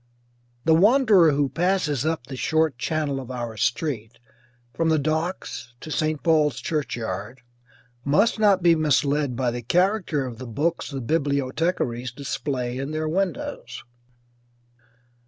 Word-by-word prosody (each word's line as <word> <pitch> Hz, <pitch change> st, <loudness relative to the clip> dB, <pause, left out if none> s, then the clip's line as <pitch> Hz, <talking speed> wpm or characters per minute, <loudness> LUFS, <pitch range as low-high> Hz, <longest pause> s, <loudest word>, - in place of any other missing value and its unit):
The 160 Hz, -, +5 dB
wanderer 205 Hz, -, +5 dB
who 140 Hz, 0 st, +2 dB
passes 155 Hz, -2 st, 0 dB
up 160 Hz, -6 st, -2 dB
the 130 Hz, 0 st, -7 dB
short 155 Hz, -1 st, +1 dB
channel 150 Hz, -1 st, -1 dB
of 130 Hz, -2 st, -8 dB
our 120 Hz, -3 st, -5 dB
street, 120 Hz, 0 st, -2 dB, 0.6 s
from 165 Hz, -1 st, 0 dB
the 160 Hz, -, +3 dB
docks 155 Hz, -6 st, -3 dB
to 155 Hz, -, -9 dB
St. 155 Hz, -1 st, -1 dB
Paul's 155 Hz, -5 st, +3 dB
churchyard, 120 Hz, -, -4 dB, 0.6 s
must 200 Hz, -, +2 dB
not 200 Hz, -4 st, +4 dB
be 170 Hz, -1 st, +6 dB
misled 145 Hz, -3 st, +1 dB
by 125 Hz, -1 st, 0 dB
the 120 Hz, +1 st, -4 dB
character 180 Hz, -, +1 dB
of 120 Hz, -3 st, -7 dB
the 130 Hz, -, -7 dB
books 155 Hz, +9 st, -1 dB
the 135 Hz, -2 st, -5 dB
bibliothecaries 140 Hz, -2 st, -1 dB
display 130 Hz, -1 st, -3 dB
in 135 Hz, +1 st, -3 dB
their 155 Hz, 0 st, -2 dB
windows. 195 Hz, -, -3 dB
150 Hz, 135 wpm, -24 LUFS, 125-165 Hz, 0.6 s, be